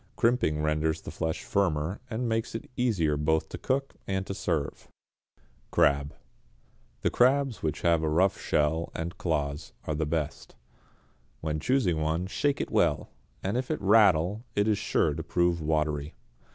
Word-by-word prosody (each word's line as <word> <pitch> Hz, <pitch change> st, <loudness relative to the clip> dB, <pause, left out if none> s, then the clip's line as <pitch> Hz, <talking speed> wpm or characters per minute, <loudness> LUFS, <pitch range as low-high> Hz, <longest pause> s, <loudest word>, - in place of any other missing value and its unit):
Crimping 115 Hz, -11 st, +2 dB
renders 75 Hz, +1 st, +1 dB
the -, -, -8 dB
flesh 80 Hz, +1 st, -3 dB
firmer, 85 Hz, -3 st, 0 dB
and 120 Hz, +1 st, -2 dB
makes 115 Hz, 0 st, -1 dB
it 115 Hz, -, -5 dB
easier 95 Hz, -12 st, +1 dB
both 80 Hz, +2 st, +1 dB
to -, -, -7 dB
cook 135 Hz, +1 st, -1 dB
and 95 Hz, -1 st, -1 dB
to 100 Hz, -, -4 dB
serve. 80 Hz, -6 st, -2 dB, 0.8 s
=Crab.= 70 Hz, 0 st, +2 dB, 0.9 s
The -, -, +1 dB
crabs 130 Hz, 0 st, +3 dB
which 80 Hz, -, -2 dB
have 85 Hz, -2 st, +3 dB
a 80 Hz, -, 0 dB
rough 90 Hz, +5 st, +2 dB
shell 80 Hz, +3 st, +1 dB
and 85 Hz, +3 st, -4 dB
claws 75 Hz, -6 st, -2 dB
are 75 Hz, -, -1 dB
the 75 Hz, 0 st, -1 dB
best. 75 Hz, -2 st, -3 dB, 0.9 s
When 80 Hz, -1 st, -2 dB
choosing 110 Hz, -, +1 dB
one 80 Hz, +3 st, 0 dB
shake 140 Hz, +9 st, 0 dB
it -, -, -3 dB
well; 80 Hz, -4 st, +1 dB, 0.3 s
if 120 Hz, +7 st, -1 dB
it 155 Hz, -, -1 dB
rattle 100 Hz, -1 st, +4 dB
it 105 Hz, +1 st, +2 dB
is 105 Hz, -2 st, +2 dB
sure 75 Hz, -, +1 dB
to 80 Hz, -, -4 dB
prove 85 Hz, +1 st, +1 dB
watery. 75 Hz, -1 st, -1 dB
85 Hz, 155 wpm, -28 LUFS, 75-105 Hz, 0.9 s, rattle